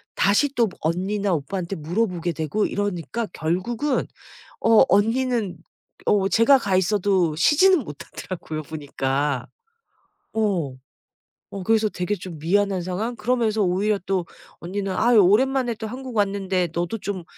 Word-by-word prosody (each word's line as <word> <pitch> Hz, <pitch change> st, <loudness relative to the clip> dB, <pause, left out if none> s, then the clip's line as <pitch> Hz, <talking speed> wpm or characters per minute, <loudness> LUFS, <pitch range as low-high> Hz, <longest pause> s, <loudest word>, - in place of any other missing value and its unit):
다시 205 Hz, +9 st, +3 dB
또 230 Hz, -3 st, +3 dB
언니나 190 Hz, +4 st, -1 dB
오빠한테 175 Hz, +5 st, -3 dB
물어보게 175 Hz, +1 st, -1 dB
되고 160 Hz, +7 st, -1 dB
이러니까 205 Hz, +3 st, -2 dB
결국은 220 Hz, -, -1 dB, 0.6 s
어 225 Hz, -1 st, +7 dB
언니는 225 Hz, -2 st, +1 dB, 0.5 s
어 195 Hz, -1 st, +2 dB
제가 230 Hz, +7 st, +5 dB
가 195 Hz, -5 st, +1 dB
있어도 190 Hz, -4 st, +1 dB
쉬지는 335 Hz, -, +5 dB
못하더라고요 155 Hz, 0 st, -7 dB
보니까. 140 Hz, -2 st, -2 dB, 0.9 s
어 190 Hz, -11 st, 0 dB, 0.8 s
어 195 Hz, -2 st, -6 dB
그래서 220 Hz, +2 st, +3 dB
되게 180 Hz, +1 st, -2 dB
좀 180 Hz, -4 st, -8 dB
미안한 195 Hz, +3 st, +1 dB
상황? 195 Hz, +7 st, -3 dB
그러면서 225 Hz, -2 st, 0 dB
오히려 200 Hz, +3 st, +1 dB
또 190 Hz, -2 st, 0 dB, 0.3 s
언니는 195 Hz, +2 st, -3 dB
"아이 235 Hz, +5 st, +3 dB
오랜만에 240 Hz, +5 st, +3 dB
또 220 Hz, 0 st, -6 dB
한국 255 Hz, +1 st, -7 dB
왔는데 195 Hz, -3 st, 0 dB
너도 175 Hz, +6 st, -2 dB
좀 195 Hz, -4 st, -4 dB
195 Hz, 295 characters per minute, -23 LUFS, 175-225 Hz, 0.9 s, 어